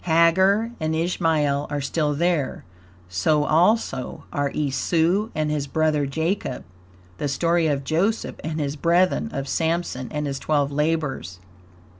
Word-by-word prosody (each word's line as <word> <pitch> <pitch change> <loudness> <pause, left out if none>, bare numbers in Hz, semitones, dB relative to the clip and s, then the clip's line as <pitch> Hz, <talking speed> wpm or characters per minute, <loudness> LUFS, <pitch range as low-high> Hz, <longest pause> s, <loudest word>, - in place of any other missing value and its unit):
Hagar 190 +7 +4
and 160 0 -1
Ishmael 160 -4 +1
are 145 - -2
still 150 +1 -1
there; 165 -3 0 0.4
so 95 - +1
also 165 - +1
are 145 0 0
Esau 165 +8 +1
and 155 -1 0
his 145 -2 -2
brother 155 -1 +1
Jacob; 160 0 -2 0.6
the - - -1
story 165 +4 +1
of 140 -2 0
Joseph 180 +10 0
and 160 +1 -3
his 145 -1 -2
brethren; 175 +7 +2
of 135 0 -4
Sampson 160 -4 -1
and 150 -1 -2
his 135 -2 -3
twelve 145 -2 0
labors. 150 - -1
155 Hz, 135 wpm, -23 LUFS, 140-170 Hz, 0.6 s, Hagar